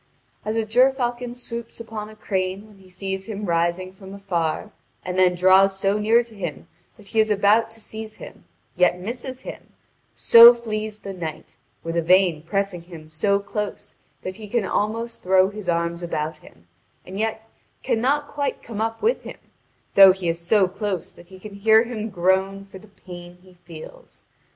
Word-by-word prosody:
As 215 +1 -3
a 225 -1 0
gerfalcon 245 0 +1
swoops 235 -2 -8
upon 220 -2 -7
a 215 - -13
crane 190 -1 -3
when 210 -2 -19
he 190 -1 -18
sees 190 +1 -5
him 210 -1 -5
rising 175 +2 -1
from 190 0 -11
afar, 185 0 -2 0.3
and 180 0 -3
then 185 -1 +4
draws 190 +2 +5
so 195 +2 0
near 225 +3 +4
to 235 -1 -17
him 175 -8 -6 0.3
that 200 -2 -17
he 225 - 0
is 220 0 +3
about 210 +2 +3
to 225 0 -14
seize 220 0 -8
him, - - -12 0.3
yet 180 0 +3
misses 245 +6 -6
him, - - -10 0.4
so 235 +1 +9
flees 215 -2 -4
the 200 -2 -8
knight, 160 -4 -7 0.3
with 165 0 -4
Yvain 170 -1 +3
pressing 195 +1 -2
him 165 -3 -13
so 200 +6 +1
close 210 +1 -5 0.3
that 185 +1 -6
he 215 -1 -9
can 225 0 0
almost 225 +4 -2
throw 190 +1 +4
his 205 -3 -7
arm 170 0 0
about 160 -2 -3
him, 85 - -19 0.4
and 190 +2 -7
yet 220 0 -3 0.4
cannot 280 +6 0
quite 285 -1 -3
come 220 -2 -6
up 225 0 -3
with 470 +3 +2
him, - - -9 0.6
though 195 -1 +9
he 185 -2 -5
is 165 0 -1
so 190 +3 +3
close 195 -1 -4
that 175 - -17
he 190 +1 -13
can 205 +2 -11
hear 220 +2 +4
him 225 -2 -5
groan 190 +1 0
for 195 -1 -12
the 215 - -17
pain 175 -3 -12
he 185 -1 -18
feels. 175 - -13
195 Hz, 180 wpm, -23 LUFS, 180-220 Hz, 0.6 s, so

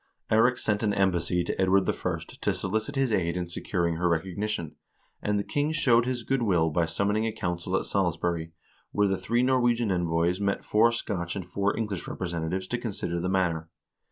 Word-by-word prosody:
Eirik 120 +3 +4
sent 105 -1 0
an 105 -2 +1
embassy 90 -2 +1
to 85 - -2
Edward 95 +1 +3
I. - - -1 0.2
to - - +1
solicit 110 +9 -2
his 135 -4 +1
aid 85 -3 +1
in 90 -1 -2
securing 85 -1 -1
her 90 +1 +1
recognition, 85 +1 -2 0.5
and 105 0 0
the 100 - 0
king 145 +6 0
showed 125 -6 +3
his 125 -2 -2
good 135 +2 0
will 85 -7 +2
by 85 +2 +2
summoning 100 +6 0
a - - -1
council 90 -1 -2
at - - -3
Salisbury, 85 -3 -1 0.4
where 105 0 +2
the 95 - +1
three 120 +5 0
Norwegian 120 -4 +2
envoys 85 0 +1
met 100 -1 -1
four 115 +2 +4
Scotch 95 -7 -3
and 95 -3 -4
four 100 +3 -1
English 105 -5 -3
representatives 85 +1 -3
to 120 - -1
consider 95 -7 -3
the 90 +2 -1
matter. 85 -4 0
95 Hz, 185 wpm, -27 LUFS, 85-110 Hz, 0.5 s, Eirik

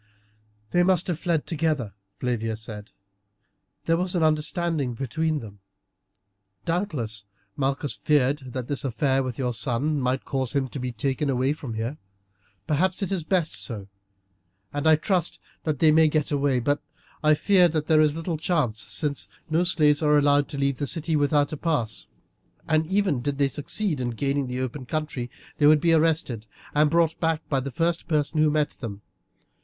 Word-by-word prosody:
"They 175 - +3
must 180 -1 +3
have 175 -3 -2
fled 165 -4 0
together," 150 - -1 0.2
Flavia 115 -3 -2
said. 105 -1 -8 1.0
"There 165 0 +3
was 180 +1 0
an 170 - +2
understanding 155 -3 0
between 155 +5 -1
them. 100 -3 -11 1.1
Doubtless 145 - -2 0.3
Malchus 140 +1 -1
feared 145 -1 +2
that 130 -2 -4
this 145 - -3
affair 135 +1 +1
with 130 -3 -4
your 125 -2 -1
son 140 +5 0
might 130 +1 0
cause 130 -3 -2
him 140 -2 +1
to 135 - -6
be 125 0 -3
taken 135 +5 -1
away 130 +2 +1
from 135 -7 -7
here. 115 +7 -3 0.7
Perhaps 180 +6 +1
it 195 - -3
is 185 -4 0
best 170 -1 0
so, 105 -5 -5 0.8
and 145 +2 0
I 160 - +7
trust 175 +2 0 0.3
that 155 -2 0
they 155 +3 +5
may 160 +1 +6
get 155 -1 0
away, 140 -2 +2
though 145 +4 +1 0.4
I 155 0 +5
fear 185 +2 +5
there 155 -1 +2
is 150 -1 +3
little 165 0 -3
chance, 145 - 0
since 145 +3 -2 0.2
no 165 +3 +3
slaves 150 -4 +3
are 150 -1 +4
allowed 145 0 +4
to 140 - -6
leave 140 -1 0
the 145 - -2
city 165 0 -1
without 145 0 +2
a - - -3
pass, 140 - -1 0.6
and 155 0 +2
even 190 -8 +1
did 140 +2 -2
they 140 -1 +2
succeed 150 +2 -1
in 125 - -1
gaining 140 +3 -1
the 125 +1 -3
open 130 0 -4
country 150 -6 -3 0.3
they 145 - +6
would 150 0 +6
be 165 +2 +3
arrested 155 -9 +1 0.3
and 150 0 +4
brought 165 0 +2
back 165 -1 0
by 135 - +2
the 135 +1 -4
first 165 +6 -1
person 155 0 +1
who 155 - +5
met 150 -1 +1
them. 105 -5 -8
145 Hz, 175 wpm, -25 LUFS, 130-160 Hz, 1.1 s, I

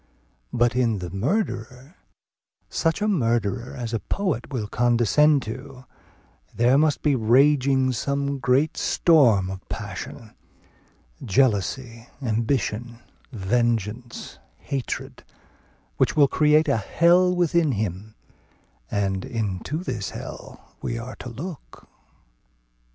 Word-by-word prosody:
But 120 0 +2
in 120 -4 +2
the 90 -2 -6
murderer, 130 - -3 0.8
such 165 +4 0
a - - +2
murderer 120 - 0
as 120 -2 -5
a 115 - 0
poet 180 - -2
will 120 -6 -2
condescend 120 +6 +3
to, 130 +3 -8 0.7
there 120 +3 +4
must 150 +1 +2
be 150 - +3
raging 130 +2 +3
some 140 +3 -2
great 135 +4 +1
storm 115 - +3
of 95 -1 -9
passion, 105 +1 -7 0.9
jealousy, 115 +2 0
ambition, 115 -1 -1 0.3
vengeance, 115 +1 -2 0.2
hatred, 135 -3 -5 0.7
which - - +2
will 145 -2 +6
create 150 +2 +3
a - - +2
hell 175 - +3
within 170 -4 +2
him; 105 0 -4 0.7
and 95 -2 -1
into 115 - -3
this 115 - -3
hell - - -10
we 115 - -3
are 120 +2 -7
to 125 - -8
look. 145 +7 -9
125 Hz, 105 wpm, -24 LUFS, 110-145 Hz, 0.9 s, will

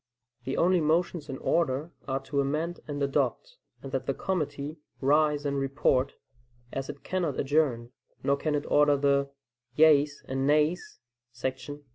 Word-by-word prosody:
The 135 - -2
only 180 0 +3
motions 160 0 0
in 135 - -4
order 155 0 0 0.2
are 135 0 -1
to 140 +1 -1
amend 155 +5 -2
and 145 -1 -3
adopt, - - -1 0.3
and - - -7
that - - -2
the - - 0
committee 150 -4 -3 0.2
"rise 150 +1 +2
and 140 -1 0
report," 135 -1 +1 0.6
as 135 0 -4
it 145 -1 -8
cannot 175 -7 -2
adjourn; 135 -5 +1 0.3
nor 140 - +3
can 150 +1 -1
it 145 - -2
order 145 -1 +4
the 140 0 +2 0.5
"yeas 150 -2 +4
and 135 +1 -1
nays" 150 +4 +1 0.4
[§ - - -17
38]. 135 +3 -4
145 Hz, 155 wpm, -28 LUFS, 140-155 Hz, 0.6 s, order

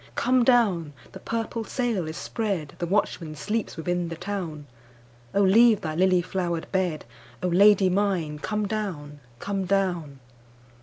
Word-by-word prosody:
Come 255 0 +3
down! 200 - +3 0.2
the 190 - -10
purple 230 +2 -3
sail 225 - -2
is 160 - -6
spread, 195 -10 -3
The 175 - -2
watchman 170 -5 -1
sleeps 210 +9 -3
within 175 +1 -1
the 165 - -5
town,O 125 -7 -5
leave 220 +2 +5
thy 155 -1 -3
lily 180 +1 +3
flowered 175 -3 -2
bed,O 150 -7 -3
Lady 195 +2 +5
mine 180 -6 0
come 210 +5 -2
down, 170 -9 -4 0.2
come 195 +7 -3
down! 175 -7 -1
180 Hz, 135 wpm, -25 LUFS, 155-205 Hz, 0.2 s, leave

